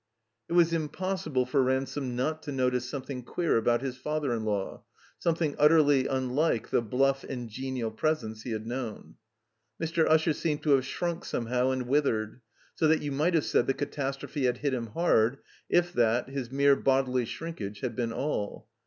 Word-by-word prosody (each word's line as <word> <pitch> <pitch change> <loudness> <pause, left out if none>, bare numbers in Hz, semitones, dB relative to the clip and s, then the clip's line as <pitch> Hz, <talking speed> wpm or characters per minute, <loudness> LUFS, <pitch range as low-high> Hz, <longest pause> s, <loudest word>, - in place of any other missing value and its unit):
It - - -3
was 170 -1 +4
impossible 160 -4 -1
for 130 +2 +2
Ransome 130 0 -1
not 155 +5 -1
to 145 - -6
notice 125 -2 0
some 140 -2 -4
thing 130 -1 -6
queer 165 +7 0
about 120 +2 +2
his 130 -2 -3
father 150 -1 -1
in 115 -2 -2
law, 100 -2 -2 0.4
something 165 -3 0
ut 150 - +7
terly 145 -4 +4
unlike 130 0 0
the - - +3
bluff 135 +4 +1
and 125 -3 -5
genial 125 0 -4
presence 110 -4 -1
he 125 - -7
had 110 -1 -3
known. 120 -2 -6 0.6
Mr. 165 0 +1
Usher 160 0 +4
seemed 150 0 -2
to 150 - +2
have 135 -2 +4
shrunk 170 +3 -3
some 120 - -3
how 125 +2 +1
and 130 -1 -1
withered, 125 -5 0 0.3
so 160 - +2
that 155 0 +3
you 145 - -2
might 155 +6 +1
have 160 - +2
said - - +2
the 135 - +1
catastrophe 140 0 -3
had 125 -1 +1
hit 140 0 -1
him 120 -2 -2
hard, 120 -2 +2 0.3
if 175 0 +2
that, 120 +1 +2
his 135 -3 -4
mere 140 +1 +4
bodily 130 -2 +1
shrinkage, 110 -9 -6
had 125 - -3
been 120 -2 -1
all. 115 -6 -3
135 Hz, 190 wpm, -29 LUFS, 125-150 Hz, 0.6 s, ut